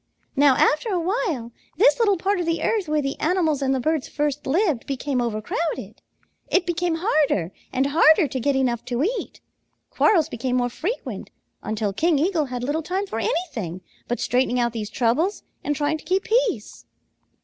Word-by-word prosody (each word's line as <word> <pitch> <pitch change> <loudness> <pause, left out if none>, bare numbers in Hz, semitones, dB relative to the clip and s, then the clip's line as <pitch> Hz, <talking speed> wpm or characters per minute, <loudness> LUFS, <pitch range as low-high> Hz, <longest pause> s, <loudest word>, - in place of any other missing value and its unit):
Now 280 -2 +5
after 310 +10 +2
a 370 -4 +1
while, 335 - -1 0.3
this 475 +5 +5
little 410 -4 +3
part 390 +3 0
of 345 - -2
the 330 0 0
earth 420 -6 0
where 300 -1 +1
the 275 +1 -3
animals 320 -4 +1
and 265 -1 +1
the - - 0
birds 310 +2 0
first 295 -1 -2
lived 315 - +1
became 275 -1 -1
overcrowded. 235 +8 -3 0.5
It 365 - +2
became 345 0 0
harder 285 - +2 0.2
and 265 +1 +1
harder 315 +3 +5
to 260 0 -4
get 280 +3 +1
enough 245 -3 0
to 245 +2 -1
eat. 455 +8 -3 0.5
Quarrels 340 -8 +3
became 250 -4 -2
more 245 -1 +1
frequent, 380 - -4 0.3
until 215 -2 -2
King 325 - +2
Eagle 325 0 +1
had 250 -2 -5
little 290 +5 -1
time 375 +5 -2
for 225 - -4
anything 225 - -2 0.3
but 240 - -2
straightening 250 +1 +1
out 235 -1 +1
these 215 -2 -4
troubles 265 - 0 0.2
and 295 - -1
trying 295 +2 0
to - - -14
keep 375 +1 0
peace. 445 - -1
295 Hz, 180 wpm, -23 LUFS, 250-350 Hz, 0.5 s, Now